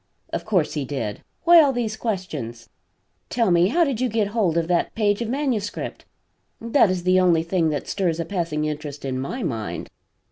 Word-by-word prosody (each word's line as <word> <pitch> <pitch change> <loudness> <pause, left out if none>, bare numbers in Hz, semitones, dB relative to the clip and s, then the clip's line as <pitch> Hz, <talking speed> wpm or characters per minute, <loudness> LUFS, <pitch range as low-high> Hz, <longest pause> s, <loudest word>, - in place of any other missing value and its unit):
"Of - - -3
course 185 -8 +1
he 150 - -2
did. 125 -7 -4 0.2
Why 345 -1 +8
all 285 -3 +4
these 235 -4 -2
questions? 155 - -4 0.6
Tell 230 -6 +1
me 175 +1 +5
how 340 - +3
did 270 -7 -1
you 255 - +1
get 215 -2 0
hold 200 -7 +1
of 165 -1 +1
that 175 -1 0
page 205 -1 +1
of 230 - -2
manuscript? 250 -6 -2 0.5
That 230 -1 +3
is 185 -1 -1
the 185 +1 +4
only 170 -3 +3
thing 165 -1 +1
that 145 -3 -3
stirs 175 -5 -1
a 165 - -1
passing 165 -4 -2
interest 150 -2 -5
in 130 -1 -2
my 215 - -4
mind." 115 - -4
185 Hz, 190 wpm, -23 LUFS, 155-225 Hz, 0.6 s, Why